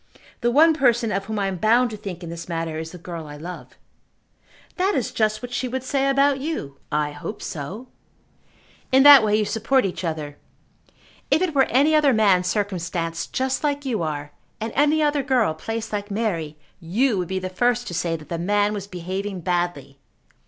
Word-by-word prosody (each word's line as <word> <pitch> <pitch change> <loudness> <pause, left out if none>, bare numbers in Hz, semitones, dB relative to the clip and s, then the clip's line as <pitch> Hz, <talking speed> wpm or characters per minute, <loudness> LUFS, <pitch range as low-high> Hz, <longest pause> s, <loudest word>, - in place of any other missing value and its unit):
The 240 - +1
one 315 +6 +6
person 240 -6 +2
of 195 +1 -2
whom 220 +1 -4
I 200 - 0
am 190 -1 -2
bound 230 +5 +3
to - - -5
think 195 -4 -7
in 165 - -6
this 170 +1 -8
matter 165 -2 -3
is 160 0 -6
the 180 - -9
girl 170 -2 -7
I 145 0 -9
love." 175 +4 -9 1.0
"That 390 +2 +1
is 255 - -1
just 215 +1 0
what 245 0 -6
she 255 - -1
would 260 +1 -4
say 275 0 0
about 275 0 +3
you." 265 - -5
"I 150 0 0
hope 145 +9 -7
so." 190 - -6 1.0
"In 265 +1 +6
that 285 -4 +10
way 210 -1 +2
you 215 0 +2
support 230 +5 +1
each 190 0 -4
other. 155 -3 -4 0.9
If 335 - +3
it 355 -4 -1
were 270 -2 +4
any 285 +5 +3
other 300 -3 +4
man 200 -5 +4
circumstanced 175 -4 -2
just 260 +2 -1
like 285 -1 -1
you 235 -7 -1
are, 150 -2 -4 0.3
and 220 +1 -4
any 300 +2 +3
other 295 -1 +2
girl 250 - +2
placed 225 +6 -5
like 205 0 -3
Mary, 180 -8 -2 0.2
you 200 +6 +1
would 180 - -2
be 190 - -2
the 185 0 -3
first 245 +6 0
to - - -6
say 165 0 -1
that 155 -2 -10
the 170 - -3
man 205 +3 +1
was 200 -2 -5
behaving 190 +1 -5
badly. 175 -6 -2
205 Hz, 200 wpm, -23 LUFS, 170-255 Hz, 1.0 s, that